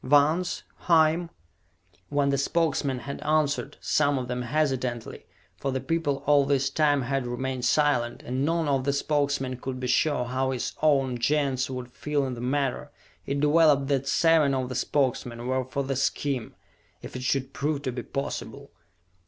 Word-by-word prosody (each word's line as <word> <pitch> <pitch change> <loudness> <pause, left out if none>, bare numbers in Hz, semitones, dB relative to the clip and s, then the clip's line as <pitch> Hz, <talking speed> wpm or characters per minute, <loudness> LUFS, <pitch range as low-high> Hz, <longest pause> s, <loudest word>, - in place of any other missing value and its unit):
Vance? 150 +6 +2 0.2
Hime?" 165 0 +4 0.8
When 145 -1 +1
the 140 - +1
Spokesmen 140 -3 0
had 140 +1 -6
answered, 150 -1 0
some 145 -2 +2
of 125 -1 -3
them 125 0 -3
hesitantly, 125 -3 -2 0.3
for 135 - -2
the 130 - -1
people 145 -3 -1
all 145 -1 +5
this 135 -1 +1
time 145 -2 +2
had 135 0 -1
remained 125 +1 -3
silent 140 -5 +1
and 130 +2 -2
none 165 +1 +1
of 135 -2 +1
the 140 +1 +1
Spokesmen 140 -3 0
could 130 0 -5
be 130 - -4
sure 125 +1 +2
how 130 +2 -1
his 130 -2 -2
own 135 -5 +2
Gens 135 0 +1
would 125 -1 -6
feel 145 +1 -1
in 130 - -3
the 120 - -7
matter 135 +1 -1 0.4
it 140 +1 -1
developed 150 -2 +4
that 135 -1 0
seven 155 -1 +4
of 130 -1 -2
the 130 - -5
Spokesmen 125 -3 -1
were 130 0 0
for 140 +2 -3
the 135 0 -2
scheme, 135 -2 -1 0.5
if - - -9
it 130 - -4
should 130 +1 -1
prove 145 0 -2
to 130 - -1
be 120 0 -4
possible. 140 +3 -5
140 Hz, 170 wpm, -26 LUFS, 130-145 Hz, 0.8 s, all